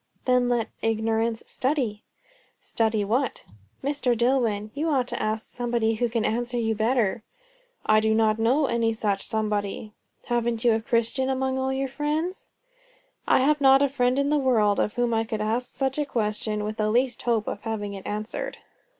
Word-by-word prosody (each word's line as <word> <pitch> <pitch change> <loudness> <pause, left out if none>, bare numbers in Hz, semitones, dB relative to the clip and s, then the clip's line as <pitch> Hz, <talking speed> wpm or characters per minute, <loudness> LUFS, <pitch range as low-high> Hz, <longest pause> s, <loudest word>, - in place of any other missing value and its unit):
"Then 250 -1 +3
let 240 -2 0
ignorance 225 +1 0
study." 255 -6 -1 0.6
"Study 220 -2 0
what?" 245 +5 -1 0.4
"Mr. 270 -4 0
Dillwyn, 230 -4 +1
you 310 +3 -1
ought 260 -5 +1
to - - -3
ask 215 +1 -1
somebody 235 -2 -1
who 235 +2 0
can 230 -1 -1
answer 240 +2 -1
you 225 -1 +1
better." 225 0 +1 0.6
"I 215 0 +5
do 220 0 +2
not 220 0 +2
know 255 +7 +3
any 230 -2 +1
such 205 -3 -1
somebody." 210 -1 -2 0.3
"Haven't 235 -1 -1
you 235 - +6
a 220 - 0
Christian 235 +4 0
among 265 0 0
all 265 0 0
your 270 0 -1
friends?" 300 +7 -3 0.8
"I - - +4
have 295 +2 +2
not 270 0 +6
a 280 - +2
friend 250 -1 +1
in 280 +1 +1
the 300 - +3
world, 220 -6 +3
of 210 - 0
whom 240 -1 +1
I 225 0 +2
could 220 -1 -4
ask 230 +4 -1
such 270 +1 -1
a 295 - +1
question 210 -3 -1
with 215 +1 -4
the 215 0 +1
least 245 +3 +1
hope 230 -3 0
of - - -4
having 210 -3 -4
it 195 -1 -8
answered." 215 +1 -4
235 Hz, 180 wpm, -25 LUFS, 220-260 Hz, 0.8 s, you